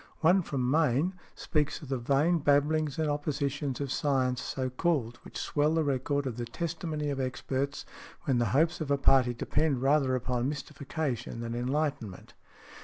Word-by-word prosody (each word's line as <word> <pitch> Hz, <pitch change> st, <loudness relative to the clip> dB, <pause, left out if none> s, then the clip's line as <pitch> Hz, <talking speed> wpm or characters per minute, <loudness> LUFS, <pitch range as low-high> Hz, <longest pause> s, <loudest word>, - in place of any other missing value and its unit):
One 180 Hz, +4 st, +5 dB
from 135 Hz, -7 st, -2 dB
Maine, 155 Hz, +3 st, +2 dB, 0.2 s
speaks 150 Hz, +1 st, -1 dB
of 140 Hz, -, -9 dB
"the 135 Hz, -2 st, -1 dB
vain 145 Hz, +8 st, +2 dB
babblings 145 Hz, 0 st, +2 dB
and 160 Hz, -1 st, +1 dB
oppositions 145 Hz, -2 st, -2 dB
of 140 Hz, -2 st, -3 dB
science 130 Hz, -3 st, +1 dB
so 130 Hz, -1 st, -3 dB
called, 130 Hz, -5 st, 0 dB
which -, -, -10 dB
swell 150 Hz, +2 st, +1 dB
the 160 Hz, -, +2 dB
record 140 Hz, 0 st, 0 dB
of 125 Hz, -3 st, -3 dB
the 120 Hz, -, -3 dB
testimony 155 Hz, +2 st, -3 dB
of 135 Hz, -, -3 dB
experts 135 Hz, +2 st, -2 dB, 0.4 s
when 130 Hz, -3 st, +1 dB
the 120 Hz, -, +2 dB
hopes 160 Hz, +9 st, +2 dB
of 150 Hz, -, -3 dB
a 140 Hz, -, +3 dB
party 130 Hz, -3 st, +4 dB
depend 135 Hz, +2 st, 0 dB
rather 135 Hz, -2 st, +3 dB
upon 125 Hz, 0 st, -1 dB
mystification 140 Hz, -4 st, -4 dB
than 115 Hz, 0 st, -4 dB
enlightenment." 125 Hz, -4 st, -2 dB
140 Hz, 165 wpm, -29 LUFS, 130-150 Hz, 0.4 s, One